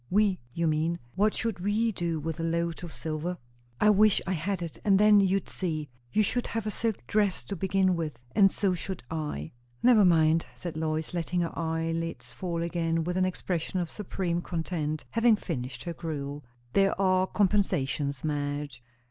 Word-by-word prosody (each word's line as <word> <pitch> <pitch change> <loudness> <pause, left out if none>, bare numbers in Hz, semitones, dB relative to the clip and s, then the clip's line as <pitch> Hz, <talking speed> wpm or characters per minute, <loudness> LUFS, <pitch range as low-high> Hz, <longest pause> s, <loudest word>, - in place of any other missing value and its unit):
"We, 200 -1 +3
you 170 +6 -1
mean? 160 +2 +1 0.2
What 210 +3 +2
should 225 -5 -2
we 210 +5 +1
do 170 -4 -2
with 160 +2 -4
a - - -1
load 170 +1 -1
of 170 - -6
silver?" 160 +3 -3 0.4
"I 210 - +6
wish 210 0 +5
I 190 - -2
had 185 +2 -2
it, 165 - -7
and 200 -2 +5
then 210 0 +7
you'd 195 0 +2
see! 155 -5 -3 0.2
You 215 - +3
should 245 +4 0
have 225 -2 -3
a 215 - -1
silk 220 - -2
dress, 205 - +1
to 200 - -4
begin 190 -1 +2
with, 155 -7 -4
and 195 -1 +6
so 195 -1 +1
should 180 -1 -5
I." 150 - -3 0.3
"Never 235 -4 +7
mind," 165 -2 +4
said 175 -3 -6
Lois, 155 +1 -2
letting 175 +1 -1
her 170 - -2
eyelids 165 0 -2
fall 170 -3 -3
again 165 -1 0
with 180 +2 -2
an 185 0 +3
expression 185 -1 -2
of 175 -2 -3
supreme 180 -4 -2
content, 160 -3 -3
having 230 0 +5
finished 130 - -5
her 170 - -4
gruel. 145 -3 -5 0.3
"There 195 -1 +3
are 185 -1 +3
compensations, 145 -10 +1
Madge." 145 -3 -2
170 Hz, 180 wpm, -28 LUFS, 160-195 Hz, 0.4 s, then